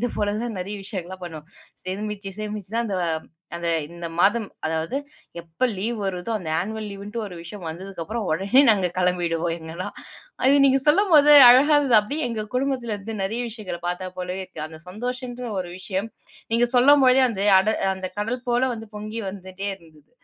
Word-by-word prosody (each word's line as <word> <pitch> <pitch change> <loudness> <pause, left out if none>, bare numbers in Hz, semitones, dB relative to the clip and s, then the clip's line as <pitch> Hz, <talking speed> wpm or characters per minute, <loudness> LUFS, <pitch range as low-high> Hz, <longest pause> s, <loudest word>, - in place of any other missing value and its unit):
இது 245 - +1
போல 205 0 0
தான் 235 -3 -4
நெறைய 200 +3 -5
விஷயங்கள்லாம் 185 -2 -6
பண்ணுவோம். 160 -2 -8 0.4
சேமிச்சு, 200 +1 -4
சேமிச்சு 210 -2 -4
தான் 235 0 +1
அந்த, 195 -3 -2 0.6
அந்த 170 0 -3 0.2
இந்த 170 0 -7
மாதம். 210 +2 +3 0.2
அதாவது 160 +10 -2 0.5
எப்ப 165 +10 -1
லீவ் 225 +5 -2
வருதோ 190 +4 -3
அந்த 170 -5 -6
ஆன்வல் 215 +2 -4
லீவுன்டு, 200 +3 -6
ஒரு 185 - -9
விஷயம் 180 0 -9
வந்ததுக்கப்பறம் 190 +5 -5
ஒடனே 200 - +4
நாங்க 195 -4 +2
கிளம்பிடுவோம் 175 -2 0
எங்கலாம். 160 +3 -6 0.5
அது 275 +2 +5
நீங்க 270 0 +4
சொல்லும்போது 310 -3 +5 0.2
அழகாருந்தது. 275 -1 +5
அப்டீயே 280 +7 -3
எங்க 225 -2 -3
குடும்பத்துல 255 -4 -1
இருந்து 215 +3 -7
நெறைய 220 +5 -2
விஷயங்கள 210 -6 -6
பாத்தா 180 +1 -3
போலவே 180 +1 -4
இருக்கு. 155 - -7
அந்த 160 0 -11
சந்தோஷம்ன்ற 245 +4 -5
ஒரு 180 - -6
விஷயம் 190 +3 -3 0.4
நீங்க 230 +1 +4
சொல்லும்போதே 265 0 +6
அந்த 195 -3 -3 0.2
அட 215 - +1 0.3
அந்த 185 -1 -5
கடல் 240 +4 -2
போல 240 +1 +2
வந்து, 225 0 -8
பொங்கி 215 +2 -5
வந்துட்டே 190 +1 -7
இருந்தது. 160 -1 -21
205 Hz, 165 wpm, -23 LUFS, 180-240 Hz, 0.6 s, சொல்லும்போதே